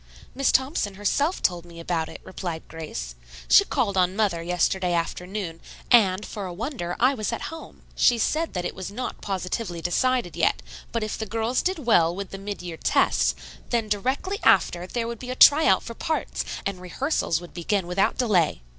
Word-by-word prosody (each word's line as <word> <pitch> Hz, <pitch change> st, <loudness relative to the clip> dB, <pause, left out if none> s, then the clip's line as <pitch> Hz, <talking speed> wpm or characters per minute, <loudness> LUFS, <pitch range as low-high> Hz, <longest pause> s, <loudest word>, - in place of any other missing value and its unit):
"Miss 275 Hz, 0 st, +2 dB
Thompson 260 Hz, -, +1 dB
herself 280 Hz, -, 0 dB
told 175 Hz, -2 st, +1 dB
me 170 Hz, -1 st, -12 dB
about 165 Hz, -1 st, -2 dB
it," -, -, -10 dB
replied 175 Hz, -4 st, -6 dB
Grace. 150 Hz, -, -6 dB, 0.3 s
"She -, -, +7 dB
called 235 Hz, -, 0 dB
on 185 Hz, 0 st, +2 dB
mother 200 Hz, -6 st, +1 dB
yesterday 180 Hz, +1 st, 0 dB
afternoon, 175 Hz, +1 st, -3 dB, 0.3 s
and, 205 Hz, -4 st, +5 dB
for 205 Hz, -3 st, -6 dB
a 180 Hz, -, -6 dB
wonder, 205 Hz, -, -4 dB
I 255 Hz, +3 st, +4 dB
was 215 Hz, -4 st, -2 dB
at 230 Hz, -, -4 dB
home. 325 Hz, -, -11 dB
She 240 Hz, -, +4 dB
said 315 Hz, +8 st, 0 dB
that 180 Hz, -1 st, -2 dB
it -, -, -3 dB
was 190 Hz, -1 st, -6 dB
not 245 Hz, +5 st, -5 dB
positively 185 Hz, -1 st, -3 dB
decided 175 Hz, +2 st, 0 dB
yet, 170 Hz, -1 st, +1 dB, 0.3 s
but 230 Hz, -1 st, -1 dB
if 215 Hz, -, -4 dB
the 220 Hz, -, -3 dB
girls 225 Hz, +3 st, 0 dB
did 375 Hz, +1 st, 0 dB
well 170 Hz, -7 st, +4 dB
with 195 Hz, 0 st, -6 dB
the 195 Hz, -, -7 dB
mid 200 Hz, -2 st, -6 dB
year 170 Hz, -2 st, -6 dB
tests, -, -, +2 dB, 0.3 s
then 230 Hz, -2 st, 0 dB
directly 265 Hz, -, -1 dB
after 175 Hz, +1 st, +3 dB
there 230 Hz, +3 st, -2 dB
would 235 Hz, -1 st, -5 dB
be 250 Hz, -, -8 dB
a 255 Hz, -, -2 dB
try 295 Hz, +4 st, +7 dB
out 190 Hz, -, +4 dB
for 230 Hz, -, -7 dB
parts, 315 Hz, +7 st, -2 dB, 0.2 s
and 195 Hz, -2 st, -3 dB
rehearsals 180 Hz, -, -1 dB
would 175 Hz, 0 st, -12 dB
begin 185 Hz, +2 st, -1 dB
without 180 Hz, +2 st, +1 dB
delay." 185 Hz, -, +2 dB
195 Hz, 190 wpm, -25 LUFS, 175-240 Hz, 0.3 s, She